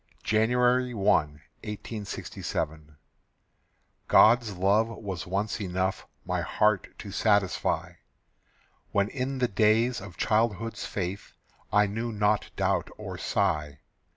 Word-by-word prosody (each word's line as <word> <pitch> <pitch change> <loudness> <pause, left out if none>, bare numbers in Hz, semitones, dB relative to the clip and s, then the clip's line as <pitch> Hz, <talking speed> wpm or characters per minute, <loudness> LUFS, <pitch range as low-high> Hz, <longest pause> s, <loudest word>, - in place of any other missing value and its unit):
January 125 +3 +2
1, 100 -2 -3
1867. 80 -2 -4 1.1
God's 115 -4 +5
love 100 +4 +3
was 100 -7 -6
once 100 +4 -2
enough 95 0 -2 0.2
My - - -1
heart 105 -2 +1
to 100 - -8
satisfy, 100 -2 +1 0.9
When 100 0 +1
in 135 0 -3
the 125 -1 +2
days 110 +3 +2
of 95 -3 -10
childhood's 115 0 0
faith 95 0 -4 0.4
I 105 0 +5
knew 115 +4 -3
not 105 0 +1
doubt - - 0
or - - -7
sigh. 75 -2 -1
105 Hz, 105 wpm, -27 LUFS, 95-115 Hz, 1.1 s, God's